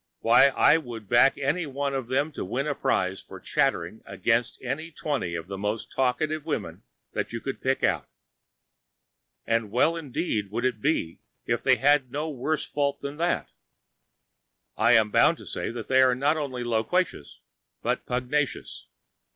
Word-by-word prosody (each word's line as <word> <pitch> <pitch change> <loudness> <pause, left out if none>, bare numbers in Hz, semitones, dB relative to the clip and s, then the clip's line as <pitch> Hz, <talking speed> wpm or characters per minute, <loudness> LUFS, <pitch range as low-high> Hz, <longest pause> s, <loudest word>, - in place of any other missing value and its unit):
Why, 120 +4 +6
I 140 +3 +4
would 115 -8 -8
back 120 +4 +5
any 150 +5 -1
one 140 0 -2
of 135 -3 -3
them 140 +5 0
to - - -5
win 125 +9 -2
a 150 - 0
prize 95 -7 0
for - - -11
chattering - - 0
against 120 0 0
any 140 +6 -3
twenty 140 - -3
of 80 -1 -5
the 95 +1 -7
most 105 +2 -3
talkative 140 +4 0
women - - -4 0.3
that - - -3
you 115 - -4
could 135 +3 -5
pick 135 0 0
out. - - +1 1.4
And 115 -2 0
well 145 +9 +2
indeed 135 - -2
would 115 +4 -2
it 120 -4 -1
be 135 - 0 0.3
if - - 0
they 130 - +4
had 135 +1 +3
no 150 +4 -2
worse 150 +3 -2
fault 140 -1 -1
than 140 +1 -5
that. 170 +2 -1 1.2
I - - +4
am 110 -2 +4
bound - - +4
to - - -12
say - - -4
that 115 -1 -6
they 130 0 +4
are 130 -1 +4
not 145 +4 +2
only 135 -5 -3
loquacious, 115 - -1 0.4
but - - -1
pugnacious. 125 +3 -2
130 Hz, 165 wpm, -26 LUFS, 115-145 Hz, 1.4 s, Why